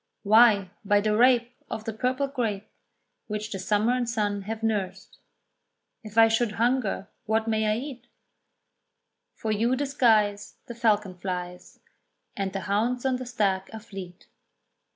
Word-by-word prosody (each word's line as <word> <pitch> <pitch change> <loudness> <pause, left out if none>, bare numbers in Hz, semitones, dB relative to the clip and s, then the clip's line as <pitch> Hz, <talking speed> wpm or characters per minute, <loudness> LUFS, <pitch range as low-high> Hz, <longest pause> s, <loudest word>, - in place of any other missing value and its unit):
"Why 210 -3 +5
by 205 0 +3
the 210 +1 +1
rape 245 +1 +4 0.2
Of 220 - -5
the 225 0 -4
purple 255 +5 0
grape, 225 -7 -3 0.6
Which 210 0 -4
the 195 - -4
summer 210 +5 +1
and 250 -2 -1
sun 205 -3 -1
have 225 0 -4
nursed." 210 -4 -3 0.8
If 215 0 -10
I 225 0 +8
should 225 -1 +1
hunger 235 -4 0 0.2
what 220 +1 +1
may 220 -1 +1
I 215 - 0
eat? 250 -2 -7 1.3
"For 220 - -3
you 230 +4 +1
the 285 +2 -1
skies 220 -7 +2
The 235 - -7
falcon 210 -5 +1
flies, 180 -1 -6 0.5
And 195 -1 -2
the 195 0 -4
hounds 230 +7 -1
on 260 -1 +1
the 255 -1 -7
stag 195 -5 0
are 220 - -6
fleet." 195 -4 -10
220 Hz, 150 wpm, -26 LUFS, 205-240 Hz, 1.3 s, I